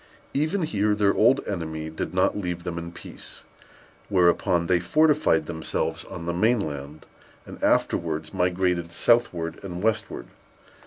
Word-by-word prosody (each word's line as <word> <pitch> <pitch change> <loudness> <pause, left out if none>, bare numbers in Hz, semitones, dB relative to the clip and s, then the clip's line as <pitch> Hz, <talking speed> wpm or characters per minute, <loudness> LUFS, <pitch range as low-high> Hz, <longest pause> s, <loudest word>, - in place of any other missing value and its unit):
Even 155 +6 0
here 105 -7 +1
their 100 -1 +3
old 125 +5 +3
enemy 80 -4 -4
did 80 - -4
not - - +2
leave 90 -3 -3
them 85 -1 -4
in 85 0 -7
peace; - - -11 0.7
whereupon 90 -2 +3
they 90 0 +3
fortified 150 - +3
themselves 80 +1 -3
on 85 - -8
the 85 - -1
main 110 +7 +3
land, 75 -3 -6 0.4
and - - -11
afterwards - - +1
migrated 90 -1 0
southward 90 -6 +1
and 90 -1 -6
westward. 110 0 -1
90 Hz, 140 wpm, -25 LUFS, 85-105 Hz, 0.7 s, their